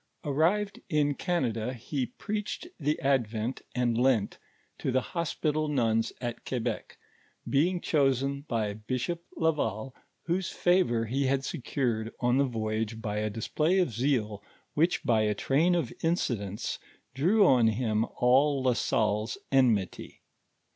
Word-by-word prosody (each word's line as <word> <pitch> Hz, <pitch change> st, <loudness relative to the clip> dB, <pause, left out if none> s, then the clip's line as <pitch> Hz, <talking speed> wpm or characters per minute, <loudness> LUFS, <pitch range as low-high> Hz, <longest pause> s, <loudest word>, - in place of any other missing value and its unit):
Arrived 175 Hz, +8 st, +1 dB
in 150 Hz, -3 st, +2 dB
Canada, 125 Hz, -, -1 dB
he 125 Hz, +2 st, -3 dB
preached 210 Hz, -, -4 dB
the 150 Hz, 0 st, 0 dB
Advent 120 Hz, -3 st, 0 dB
and 120 Hz, -2 st, +1 dB
Lent 125 Hz, -5 st, +2 dB, 0.4 s
to -, -, -1 dB
the 130 Hz, -, +3 dB
hospital 155 Hz, -3 st, -1 dB
nuns 115 Hz, -6 st, +1 dB
at 120 Hz, -2 st, -5 dB
Quebec, 120 Hz, -3 st, -3 dB, 0.5 s
being 175 Hz, +6 st, +2 dB
chosen 140 Hz, -3 st, +1 dB
by 110 Hz, -4 st, -1 dB
Bishop 130 Hz, +10 st, -3 dB
Laval, 135 Hz, -7 st, 0 dB, 0.3 s
whose 175 Hz, +1 st, -1 dB
favor 175 Hz, -11 st, +2 dB
he 135 Hz, +4 st, 0 dB
had 135 Hz, 0 st, +1 dB
secured 120 Hz, -4 st, -2 dB
on 125 Hz, +1 st, +2 dB
the 140 Hz, -, +4 dB
voyage 110 Hz, -2 st, -2 dB
by 105 Hz, -2 st, -3 dB
a 105 Hz, 0 st, 0 dB
display 150 Hz, -, 0 dB
of 180 Hz, -11 st, +1 dB
zeal 110 Hz, -4 st, 0 dB, 0.3 s
which 165 Hz, +4 st, +2 dB
by 115 Hz, -2 st, +3 dB
a 105 Hz, -1 st, +1 dB
train 160 Hz, -, +2 dB
of 150 Hz, -9 st, -1 dB
incidents 110 Hz, -, -1 dB, 0.3 s
drew 190 Hz, -, +4 dB
on 125 Hz, -7 st, +5 dB
him 110 Hz, -1 st, +1 dB
all 135 Hz, +3 st, +3 dB
La 130 Hz, -1 st, +3 dB
Salle's 110 Hz, -1 st, 0 dB
enmity. 120 Hz, -9 st, +1 dB
130 Hz, 135 wpm, -29 LUFS, 110-150 Hz, 0.5 s, on